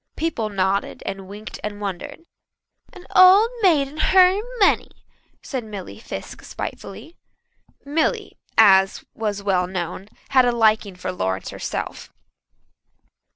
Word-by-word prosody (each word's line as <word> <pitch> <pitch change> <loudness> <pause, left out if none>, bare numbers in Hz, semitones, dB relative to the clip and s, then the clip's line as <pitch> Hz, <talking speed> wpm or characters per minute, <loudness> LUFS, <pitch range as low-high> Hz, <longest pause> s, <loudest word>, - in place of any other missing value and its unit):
People 270 -10 -2
nodded 195 0 -1
and 195 -1 -6
winked 210 +2 -9
and 210 -1 -5
wondered. 195 - -6 0.7
"An 365 - -14
old 385 +5 +7
maid 315 -8 +4
and 305 +3 -6
her 375 +2 +5 0.2
money," 395 - +3 0.5
said 260 -4 -4
Milly 200 - -9
Fiske - - -8
spitefully. 250 - -8 0.7
Milly, 295 +3 -1 0.2
as 195 -3 +5
was 205 -2 -3
well 185 -3 +1
known, 185 +2 -5 0.2
had 260 -2 +5
a 245 - +3
liking 220 -4 +2
for 180 0 -5
Lawrence 95 - -3
herself. - - -6
215 Hz, 120 wpm, -22 LUFS, 190-295 Hz, 0.7 s, old